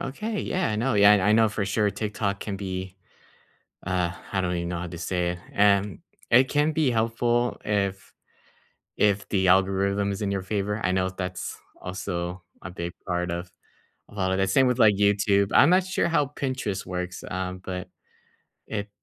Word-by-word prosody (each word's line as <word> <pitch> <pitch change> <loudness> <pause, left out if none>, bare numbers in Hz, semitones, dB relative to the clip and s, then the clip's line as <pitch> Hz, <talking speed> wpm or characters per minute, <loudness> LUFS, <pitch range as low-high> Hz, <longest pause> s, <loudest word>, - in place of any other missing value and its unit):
Okay, 210 - -3
yeah, 185 -1 -1
I 105 - -1
know, 120 +3 0
yeah, 100 0 +7
and 105 -2 +4
I 105 +3 +4
know, 110 0 +5
for 105 -1 -2
sure, 105 +1 +1
TikTok 100 -1 -3
can 100 -2 -4
be 95 -1 -5 0.9
uh, 90 -2 0 0.2
I 95 - 0
don't 90 -1 -1
even 85 0 -3
know 85 -1 -3
how 90 - -4
to 85 - -8
say 90 +1 -1
it. 90 - -7 0.2
Um, 100 -2 +3 0.3
It 125 +3 +6
can 150 +1 +2
be 150 -4 +2
helpful 120 +1 0
if 100 -2 -2 0.8
if 100 -1 +2
the 95 -2 +2
algorithm 95 +2 +2
is 100 +2 -5
in 100 - -1
your 100 -1 -2
favor. 105 +2 -2
I 95 - +2
know 95 0 +1
that's 90 0 -5 0.2
also 90 -1 -4 0.2
a 95 - -7
big 85 -1 -5
part 90 -1 -1
of 85 +1 -5 0.6
a - - -16
lot 95 -2 0
of 95 - +1
the 95 - +2
same 130 +8 +4
with, 125 0 0
like, 110 -3 +6
YouTube. 100 0 +2
I'm 140 - +7
not 185 +1 +4
sure 185 - 0
how 160 -3 +2
Pinterest 130 -8 -3
works, 90 0 -5
um, 95 0 -4
but 90 -1 -6 0.8
it 105 -1 -4
100 Hz, 190 wpm, -25 LUFS, 95-110 Hz, 0.9 s, yeah